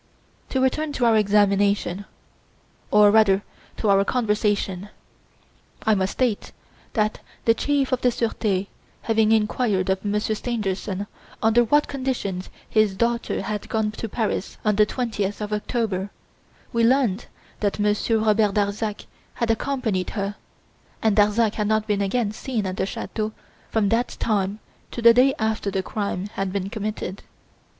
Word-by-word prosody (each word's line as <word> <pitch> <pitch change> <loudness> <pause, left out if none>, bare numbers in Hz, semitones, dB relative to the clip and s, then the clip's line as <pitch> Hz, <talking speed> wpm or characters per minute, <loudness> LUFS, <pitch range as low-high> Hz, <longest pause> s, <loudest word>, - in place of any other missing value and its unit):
To 265 - 0
return 290 +4 +1
to 245 - 0
our 230 -1 +5
examination, 200 -2 +2 0.8
or 210 -1 +6
rather 205 -2 +4 0.3
to 220 - -1
our 195 0 +5
conversation. 210 -4 0 0.9
I 220 - +3
must 190 -1 0
state 245 -5 -1 0.4
that 215 -2 0 0.3
the 230 - +6
Chief 280 +2 0
of 255 -1 0
the 250 - +4
Surete 215 -5 -1 0.4
having 220 -1 +2
inquired 210 -3 +1
of 190 0 -1
Monsieur 210 +1 0
Stangerson 205 -4 -3 0.4
under 225 +2 +5
what 295 +6 +3
conditions 250 -9 -3 0.2
his 215 -3 +2
daughter 235 +3 0
had 210 -2 -4
gone 220 -1 0
to 220 +1 -6
Paris 215 -2 -2
on 210 -1 +3
the 210 -1 +5
20th 210 -5 -2
of 210 0 -4
October, 210 -3 -1 0.6
we 230 0 +2
learned 240 -4 +2 0.3
that 205 -2 0
Monsieur 210 +2 +1
Robert 215 -2 +2
Darzac 205 +1 -1 0.3
had 235 -1 +1
accompanied 225 -6 -1
her, 200 0 -1 0.7
and 220 -2 +3
Darzac 210 +1 +3
had 210 -1 -1
not 215 0 +1
been 205 -2 0
again 205 +2 0
seen 220 -1 -3
at 185 0 -3
the - - 0
chateau 215 +1 -4 0.4
from 215 -3 +1
that 235 +3 0
time 200 -2 0 0.3
to - - -7
the 235 0 +7
day 265 +3 +4
after 220 -2 -1
the 190 -1 -1
crime 200 -2 -3
had 195 -1 -2
been 195 0 -3
committed. 210 -2 -4
215 Hz, 150 wpm, -23 LUFS, 200-230 Hz, 0.9 s, the